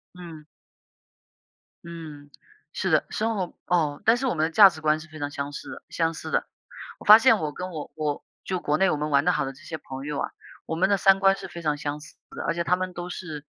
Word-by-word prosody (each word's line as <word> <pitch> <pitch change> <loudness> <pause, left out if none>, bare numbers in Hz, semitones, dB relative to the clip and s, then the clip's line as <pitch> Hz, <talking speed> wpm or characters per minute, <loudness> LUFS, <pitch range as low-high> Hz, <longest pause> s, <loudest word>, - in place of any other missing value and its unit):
嗯。 165 -4 -10 1.4
嗯， 155 -4 -10 0.4
是 - - -2
的， - - +3
生 225 +1 -1
活 185 -4 -3
哦， 155 -5 0
但 225 +2 +6
是 260 - -2
我 255 - +1
们 155 - +1
的 - - -1
价 200 +3 +9
值 170 - -10
观 155 0 +2
是 155 - -12
非 155 - -11
常 145 0 -2
相似 140 0 -6
的 - - -9
相 165 -1 0
似 - - -7
的。 - - 0 0.5
我 - - -13
发 215 +1 +10
现 230 -3 +5
我 155 -3 -2
跟 180 +5 -6
我 155 -4 -7
我 150 -2 -2 0.2
就 185 -1 -2
国 150 +1 +1
内 190 +2 +3
我 - - +1
们 150 +1 -2
玩 140 0 +3
得 180 - +3
好 - - 0
的 135 - -4
这 135 - -17
些 160 - -6
朋 135 -2 -8
友 150 -1 -3
啊， - - -2 0.4
我 160 - -3
们 190 +3 +2
的 200 - +4
三 195 0 +4
观 195 0 +4
是 - - -8
非 170 - -8
常 150 -2 0
相 145 +1 -4
似 155 - -14 0.2
的。 - - -6
而 - - +1
且 170 0 -2
他 180 +1 +2
们 185 0 -4
都 175 +1 -6
是 155 -5 -7
160 Hz, 275 characters per minute, -25 LUFS, 150-185 Hz, 1.4 s, 发